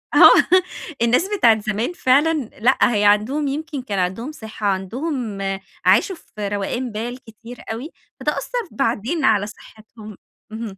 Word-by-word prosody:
آه 370 - +7 0.4
الناس 250 - +2
بتاع 235 -8 +6
الزمان 220 - -2
فعلًا 295 0 +3 0.3
لأ، 250 +4 +3 0.2
هي 205 0 +2
عندهم 235 +9 +2
يمكن 295 0 -4
كان 205 -6 -3
عندهم 190 +11 -2
صِحَة، 220 -6 -6
عندهم 215 - -3 0.4
عاشوا 380 - +4
في 210 -9 -7
روقان 205 +5 -3
بال 235 +4 -5
كتير 230 +2 -12
أوي، 255 +9 -6 0.3
فده - - 0
أثّر 480 -8 -4
بعدين 270 +4 -1
على 205 -2 +3
صِحَتهم. 215 -1 -13 0.3
اهم. 220 -3 -6
230 Hz, 140 wpm, -21 LUFS, 210-275 Hz, 0.4 s, آه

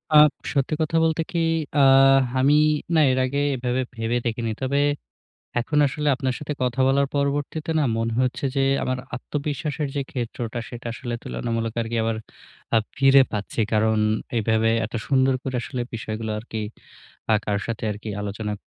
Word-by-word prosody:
আ - - +10 0.4
সত্যি 140 +2 0
কথা 155 +1 +1
বলতে 160 0 +1
কি? 170 - 0 0.4
আ - - +3 0.6
আমি 135 +3 +4 0.4
না 160 - +5
এর 130 - 0
আগে 140 +2 -1 0.2
এভাবে 125 +1 -1
ভেবে 115 +1 -1
দেখিনি। 115 -1 -1
তবে 135 +2 +1 0.8
এখন 150 +5 0
আসলে 150 +2 -1
আপনার 130 -1 -2
সাথে 150 0 -4
কথা 125 +1 0
বলার 140 +1 +3
পরবর্তীতে 145 +2 -1
না 150 - +2
মনে 115 0 -1
হচ্ছে 130 +2 -1
যে 135 - +3 0.2
আমার 130 0 -1 0.2
আত্মবিশ্বাসের 145 +3 -3
যে 140 - +1
ক্ষেত্রটা 120 -2 -4
সেটা 120 -1 -9
আসলে 120 0 -5
তুলনামূলক 115 -1 -3
আরকি 115 +1 -3
আবার 115 0 0 0.6
আ - - +6 0.2
ফিরে 135 0 +6
পাচ্ছি। 105 +2 -3
কারণ 110 0 +3 0.4
এভাবে 110 0 +2 0.2
এত 115 - -16
সুন্দর 135 -1 +3
করে 130 -1 -3
আসলে 125 -1 -4
বিষয়গুলো 110 -1 -4
আরকি 110 0 -6 0.7
আ - - +6
কারো 100 -1 0
সাথে 115 -1 -3
আরকি 105 +2 -8
আলোচনা 105 +1 -4
125 Hz, 160 wpm, -24 LUFS, 115-140 Hz, 0.8 s, আ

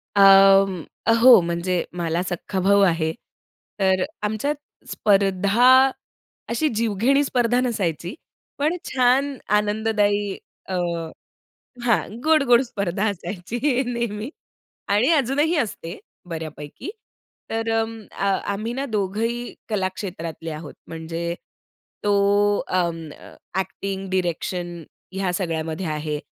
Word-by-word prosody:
अं, 195 -2 +6 0.4
हो 250 -4 +9
म्हणजे 170 +1 -1
मला 170 0 -1
सख्खा 185 +2 -3
भाऊ 200 +2 +4
आहे. 160 -1 0 0.7
तर 190 -1 +3 0.2
आमच्यात 220 +8 -1 0.3
स्पर्धा 205 +6 +4 0.6
अशी 240 +7 +1
जीवघेणी 230 +6 +2
स्पर्धा 245 -3 +1
नसायची. 185 -7 -2 0.4
पण 305 +4 +1 0.2
छान 260 +2 +2 0.2
आनंददायी 205 -1 0 0.3
अ, 185 - -1 1.1
हां 235 -2 +3 0.2
गोड-गोड 275 -6 +5
स्पर्धा 200 -5 -2
असायची 185 +3 -5 0.3
नेहमी 235 -1 -3 0.6
आणि 210 +6 +3
अजूनही 290 +5 +1
असते 200 - -3 0.3
बऱ्यापैकी. 155 - -7 0.6
तर 225 0 -2
अ, 225 -2 -3 0.3
आम्ही 220 +4 -4
ना 270 +2 -2
दोघंही 225 +2 -2 0.2
कला 200 -4 0
क्षेत्रातले 165 -4 -6
आहोत. 155 -1 -8
म्हणजे 165 +1 -4 0.7
तो 205 - +2 0.5
अं, 170 -3 -1
अ, - - -14 0.2
ॲक्टिंग, 195 0 -4
डायरेक्शन 175 -1 -2 0.4
ह्या 190 -1 -1
सगळ्यामध्ये 165 -1 -2
आहे 150 -1 -3
200 Hz, 100 wpm, -23 LUFS, 175-235 Hz, 1.1 s, हो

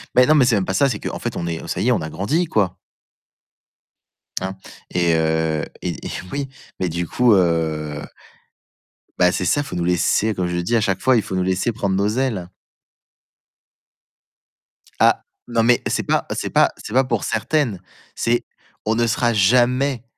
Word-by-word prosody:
Mais 125 - +7
non, 155 - +4
c'est 120 -2 +3
même 100 -2 0
pas 95 - -2
ça, 140 +7 +3
c'est 105 -5 -3
qu'en - - -5
fait, - - -4
on 85 - -3
est, 85 -1 -3
heu, - - -9
ça - - -2
y - - 0
est, - - +4
on - - +1
a 80 - -4
grandi, 145 - 0
quoi. 100 - 0 1.6
Hein 95 +1 -4 0.4
et 85 -2 +2
heu 80 -1 0 0.2
et - - -5
et - - -4 0.2
oui, 140 -1 -3 0.3
mais 90 - 0
du 85 +1 -3
coup, 125 +3 +3
heu 80 -5 0 1.2
bah 90 0 +5
c'est 90 - -2
ça, 145 +10 +2
faut - - -7
nous 90 - -1
laisser, 90 +5 +1
comme 90 - -1
je 90 0 -2
dis 85 +7 0
à 115 - +3
chaque 95 -2 0
fois: 130 0 +4
«Il 110 - +1
faut 95 - -5
nous 95 - +1
laisser 95 +5 0
prendre 100 -4 -1
nos 100 +1 +1
ailes». 110 -6 -1 2.5
Ah, - - +4 0.2
non, 120 -1 +1
mais 120 +1 +4
c'est - - -1
pas - - 0
c'est - - -3
pas - - +3
c'est 105 - -9
pas 130 - +4
pour 130 - -1
certaines, 125 - 0 0.3
c'est 120 +1 +1 0.4
on 110 +1 +1
sera 120 +1 +1
jamais, 125 +5 +2
100 Hz, 185 wpm, -21 LUFS, 90-120 Hz, 2.5 s, Mais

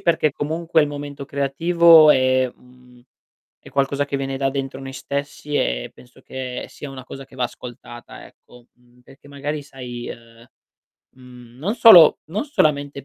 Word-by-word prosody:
perché 160 -4 +1
comunque 160 +3 -1
il 150 - +2
momento 145 -1 -8
creativo 160 +3 +5
è 130 -1 +2
un 125 -1 -21 0.6
è - - -14
qualcosa 140 +1 -1
che 140 - -3
viene 135 0 -4
da 135 - 0
dentro 135 -1 -5
noi 135 0 -9
stessi 140 +2 -6
e - - -1
penso 125 +1 -19
che 130 -1 -6
sia 145 - -10
una 130 -1 -10
cosa 135 +1 -10
che 130 - -18
va 125 - -1
ascoltata 120 -1 -10
ecco, 125 -1 -20
mhmm, 125 0 -28
perché 135 +3 -19
magari 145 +2 -5
sai, 125 -3 -9
ehm, 115 0 -13 0.7
mhmm, 125 -1 -16
non 190 +10 -2
solo 180 -10 +8
non 210 - -2
solamente 145 - -1
135 Hz, 160 wpm, -21 LUFS, 125-145 Hz, 0.7 s, solo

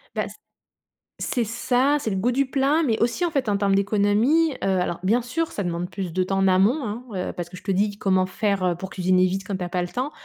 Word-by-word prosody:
Bah - - -1
c - - -11 0.9
c'est 245 - 0
ça, 250 +5 +1
c'est 220 - -2
le 190 - -1
goût 235 +6 +1
du 275 +2 +1
plat, 280 +4 +2
mais 225 -6 +1
aussi 235 +9 +1
en 340 - +1
fait, 270 -6 -1
en 200 - +2
termes 195 -1 +2
d'économie. 210 +11 +2
Heu, - - -9 0.2
alors, 175 -1 -2
bien 230 +5 +2
sûr, 325 +7 -2
ça 200 - -3
demande 175 0 -3
plus 185 -4 -5
de 185 +1 +1
temps 195 +1 -1
en 195 0 +3
amont, 200 +11 +3
hein, 220 +3 -5 0.2
heu, - - -4
parce 175 -2 -6
que 180 - -11
je 185 - -12
te 200 - -3
dis 200 +2 0
comment 185 -1 +2
faire, 200 0 -1
heu, 180 -1 +2
pour 190 +2 -7
cuisiner 185 0 +2
vite 190 +1 -2
quand 200 - -3
tu 185 - -6
as 175 - -4
pas 180 0 -1
le 175 - -2
temps. 255 +9 -3
200 Hz, 270 wpm, -24 LUFS, 185-245 Hz, 0.9 s, en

